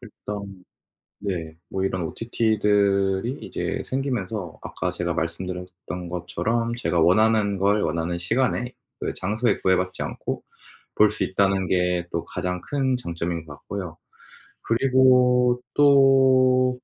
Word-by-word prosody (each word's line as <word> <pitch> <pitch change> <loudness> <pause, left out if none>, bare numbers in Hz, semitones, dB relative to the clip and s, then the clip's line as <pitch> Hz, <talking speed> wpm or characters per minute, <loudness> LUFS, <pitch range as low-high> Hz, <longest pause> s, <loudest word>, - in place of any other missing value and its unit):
일단 100 -3 -8 0.6
네 85 -5 -4
뭐 95 0 -2
이런 95 -2 -1
OTT들이 105 - +1
이제 - - -3
생기면서 110 - -3
아까 90 - -3
제가 85 -1 -2
말씀드렸던 90 +1 -5
것처럼 115 +7 -2
제가 90 -8 0
원하는 100 +3 +3
걸 100 +2 +2
원하는 85 +2 -1
시간에 125 +7 0 0.3
그리고 - - -3
장소에 110 +5 0
구애받지 95 0 0
않고 - - -5 0.5
볼 105 -1 +5
수 - - -2
있다는 95 -1 +1
게 90 -1 +1
또 85 - -3
가장 90 0 -3
큰 135 -3 0
장점인 85 -5 -4
것 75 - -10
같고요. 90 -5 -7 0.7
그리고 125 0 +4
또 130 -2 +5
100 Hz, 265 characters per minute, -24 LUFS, 90-125 Hz, 0.7 s, 볼